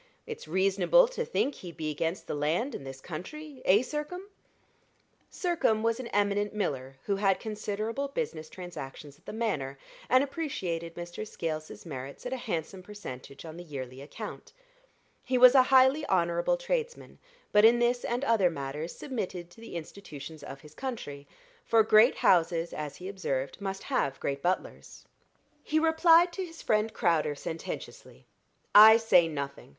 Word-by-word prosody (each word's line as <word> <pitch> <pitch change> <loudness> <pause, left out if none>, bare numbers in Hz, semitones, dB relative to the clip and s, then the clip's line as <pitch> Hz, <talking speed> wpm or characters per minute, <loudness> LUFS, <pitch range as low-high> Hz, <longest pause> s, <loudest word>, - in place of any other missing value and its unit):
"It's 465 0 -8
reasonable 195 - +4
to - - -3
think 455 - 0
he'd 175 -8 -10
be 155 -1 -2
against 165 +4 -2
the - - -4
land 160 - 0
and 135 - -7
this 135 0 -8
country 275 - -8
eh, 205 +6 +5
Sircome?" 300 +7 -5 1.1
Sircome 335 - +1
was 230 +1 +1
an 255 - -5
eminent 205 0 0
miller 135 -9 -3
who 200 -1 -1
had 195 -1 +2
considerable 215 +4 -3
business 165 - -4
transactions 150 -5 -9
at - - -32
the - - -4
Manor, 150 -12 -2 0.3
and 255 +2 +5
appreciated 180 - -4
Mr. 175 +3 -6
Scales's 155 -4 -5
merits 135 - -8
at 250 - -3
a - - -2
handsome 190 -5 -4
percentage 140 -9 -9
on 160 0 -9
the 175 - -8
yearly 130 -5 -7
account. 140 - -9 0.7
He 255 0 0
was 250 0 +9
a 265 - +8
highly 265 +3 +5
honorable 170 - +1
tradesman, - - -3 0.3
but 210 0 +5
in 230 +2 +7
this 240 +1 +1
and 245 +3 -2
in - - -2
other 200 -6 +4
matters 150 +1 -5
submitted 185 -9 -5
to 225 - -16
the 230 - -9
institutions 155 -3 -8
of 135 - -9
his 150 -1 -15
country; 155 - -6 0.4
for 225 - +4
great 220 +3 +6
houses, 170 -1 +2
as 150 -2 -5
he 180 - -8
observed, 160 -7 -3
must 195 -1 -4
have 140 - -1
great 140 0 -3
butlers. 180 +4 -3 0.6
He 310 - 0
replied 330 +2 +5
to 380 - -3
his 330 -2 -10
friend 215 +1 +1
Crowder 165 -8 +1
sententiously. 160 +3 -7 0.5
"I 220 +2 +10
say 185 -7 +4
nothing. 140 -3 -5
195 Hz, 160 wpm, -29 LUFS, 155-255 Hz, 1.1 s, I